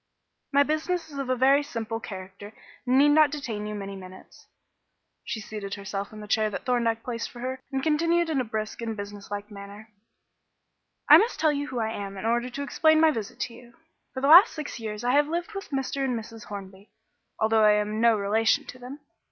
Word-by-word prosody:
My 285 0 +5
business 315 +2 -2
is 280 - -7
of 270 -2 -4
a 255 - +2
very 270 +3 +4
simple 230 -5 -5
character 195 0 -9 0.3
and 255 +1 +3
need 290 +2 +6
not 300 0 +5
detain 235 -8 -5
you 210 - -5
many 200 -1 -6
minutes." 185 -1 -13 0.8
She 220 - -4
seated 210 -2 -6
herself 200 0 -5
in 215 -1 -10
the 210 - -9
chair 215 0 +2
that 210 - -6
Thorndyke 235 -3 0
placed 230 -2 -4
for 240 - -12
her, 260 +1 -4
and 265 -1 -2
continued 335 +2 +2
in 300 -5 0
a - - -1
brisk 220 -1 -5
and 225 -1 -4
business 205 0 -8
like 205 +1 -6
manner 200 +2 -11 1.2
"I - - +10
must 460 +3 0
tell 310 - +3
you 285 0 -3
who 255 - -6
I 220 -1 -1
am 200 -2 -6
in 190 - -6
order 240 +2 +1
to 280 +3 -5
explain 315 +2 +3
my 320 0 +5
visit 225 -7 -6
to 240 - -3
you. 240 0 -16 0.4
For 260 - -3
the 275 - +1
last 350 +9 +9
six 305 -4 -6
years 215 -1 -5
I 245 - +2
have 290 +2 +4
lived 345 +6 -3
with 390 0 -7
Mr. 275 0 -2
and 255 -3 0
Mrs. 225 0 -11
Hornby, 195 0 -9 0.5
although 220 0 +3
I 210 0 +6
am 210 +1 -1
no 230 -2 +5
relation 215 +2 +1
to 255 - -10
them. 260 +4 -9
230 Hz, 215 wpm, -26 LUFS, 210-280 Hz, 1.2 s, I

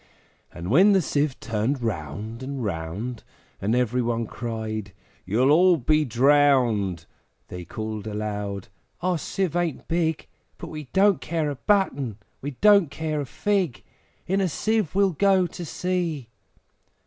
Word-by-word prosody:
And 85 +3 -6
when 190 - +6
the 190 - +4
Sieve 145 -2 0
turned 115 +5 -1
round 105 - -4
and 135 -1 -4
round, 100 +6 -4 0.4
And 105 +4 +1
every 125 0 +1
one 115 -1 -1
cried, 110 -3 -5 0.3
`You'll 125 +8 +3
all 175 +3 +6
be 155 +3 +2
drowned!' 120 - +3 0.4
They 90 -1 -7
called 110 +2 -5
aloud, 105 0 -4 0.3
`Our 180 -2 +1
Sieve 185 +1 -2
ain't 175 -5 -1
big, 165 -2 0 0.3
But - - -8
we 155 -1 -7
don't 195 +7 +3
care 160 -3 -1
a - - -4
button! 140 - 0 0.2
we 145 0 -5
don't 205 -6 +6
care 155 0 -3
a 140 - -5
fig! 190 - -1 0.4
In 195 +2 +1
a 185 - +1
Sieve 215 +1 0
we'll 195 -1 +4
go 190 +2 +3
to 175 +1 -7
sea!' 170 -7 -2
135 Hz, 145 wpm, -25 LUFS, 110-175 Hz, 0.4 s, when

